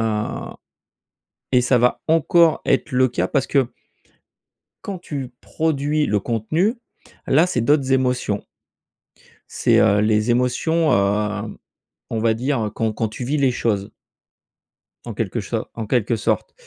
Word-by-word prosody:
heu, 115 - +1 1.5
et 125 -1 +4
ça 125 0 +3
va 125 +1 +2
encore 165 +1 +3
être 135 +2 +1
le 130 0 +3
cas 125 - -1
parce 140 -3 0
que 135 -4 +2 1.2
quand 195 -3 -5
tu 135 -7 -6
produis 150 -1 0
le 105 - +1
contenu, 155 - 0 0.5
là 160 +6 +4
c'est 125 -9 -1
d'autres 135 +1 +2
émotions 125 -5 0 1.1
c'est - - +2
heu, 105 +1 +4
les 105 +1 +1
émotions, 130 +6 +1
heu, 105 +1 0 0.5
on 115 - -2
va 115 0 +2
dire 125 -1 -1
heu, - - -2
quand 110 +1 -2
quand 110 - -1
tu 110 +3 -7
vis 145 +5 -1
les 135 -3 +3
choses 105 -5 -1 1.1
en - - -6
quelque - - -3
cho - - -4
en 110 -2 -5
quelque 115 -1 +1
sorte. 105 - -1
125 Hz, 145 wpm, -21 LUFS, 110-145 Hz, 1.5 s, et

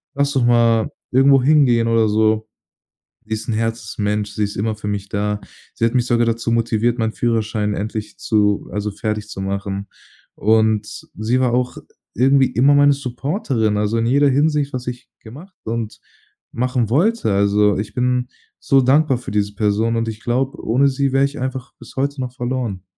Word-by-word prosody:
Lass 140 0 +1
doch 135 -4 +1
mal 115 -2 +3 0.2
irgendwo 135 +1 +5
hingehen 130 -5 +4
oder 115 -1 +3
so“. 110 +1 +1 0.8
Sie 110 - -4
ist 110 - -7
'n - - 0
Herzensmensch, 105 -2 -2
sie 105 - -2
ist 100 - -6
immer 110 +2 -1
für 105 0 -7
mich 100 -1 -3
da. 105 0 -2 0.4
Sie 115 - +1
hat 115 - 0
mich 125 -1 +2
sogar 120 -1 +2
dazu 115 0 -1
motiviert, 115 0 +1
meinen 110 -1 0
Führerschein 110 -3 -1
endlich 105 0 -5
zu 105 -2 +1
also 105 0 -2
fertigzumachen. 100 -1 -4 0.5
Und 110 -2 +1
sie 115 +5 0
war 125 -2 +1
auch 125 0 -1 0.4
irgendwie 135 +3 +4
immer 130 +3 +3
meine 145 0 +5
Supporterin, 130 - -2
also 105 +2 0
in 115 - 0
jeder 140 +3 +4
Hinsicht, 145 +1 +1
was 125 -1 -5
ich 125 0 -6
gemacht 150 - -12
und 115 -1 -4 0.5
machen 125 -2 -1
wollte. 200 - +1
Also, 100 +1 +2
ich 105 +1 -5
bin 125 0 0 0.3
so 135 -1 +3
dankbar 135 +1 +3
für 120 - -8
diese 105 0 -1
Person 110 +2 +1
und 115 0 -1
ich 110 -1 -8
glaube, 130 +3 -1
ohne 130 +5 +3
sie 135 0 -1
wäre 135 0 +3
ich 140 +1 -5
einfach 130 0 -5
bis - - -14
heute 140 +1 -1
noch 125 -1 -5
verloren. 120 -7 -3
115 Hz, 175 wpm, -19 LUFS, 105-130 Hz, 0.8 s, irgendwo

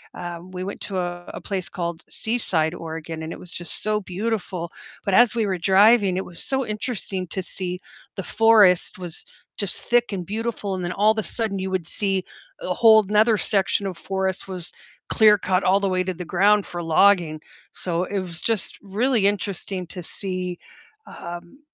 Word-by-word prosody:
um, 175 +1 -7
we 185 0 -5
went 200 - -6
to 195 -2 -3
a 175 0 -4
a - - -7
place 185 -7 -4
called 170 -2 -4
Seaside, 180 -9 -1
Oregon, 160 -1 -6
and 160 - -5
it - - -10
was 180 - -10
just 175 - -4
so 215 0 +1
beautiful, 185 -3 -3 0.3
but 195 - 0
as 240 -2 +6
we 225 -2 +1
were 190 -2 0
driving, 195 +1 +5
it 190 - -2
was 170 - -7
so 265 -1 0
interesting 210 -4 -3
to 190 - -2
see 180 -1 -4 0.4
the 195 - -3
forest 210 -6 +4
was 175 -3 -8 0.3
just 200 -3 -3
thick 240 -2 +2
and 180 -2 -2
beautiful, 215 -2 -3
and 180 -1 -3
then 175 - -2
all 210 +3 +4
of - - -1
the 215 - 0
sudden 220 -4 -2
you 190 0 -3
would 180 -3 -1
see 195 -2 -1 0.4
a 180 - -1
whole 220 +1 +7
'nother 215 +2 +4
section 195 0 +1
of 180 -3 -5
forest 190 +1 -2
was 180 -3 -7 0.4
clear-cut 200 -4 +4
all 195 +2 +4
the 200 -1 0
way 185 0 +1
to 185 0 -2
the 175 0 -7
ground 200 +4 +3
for 175 -1 -5
logging, 165 -2 +4 0.3
so, 175 0 -2
it 200 +1 -2
was 175 -2 -5
just 225 -4 -1
really 215 +2 +1
interesting 190 -2 -2
to 180 -1 -7
see, 185 -1 -5 0.5
um, 175 +9 -9
190 Hz, 190 wpm, -23 LUFS, 175-210 Hz, 0.5 s, whole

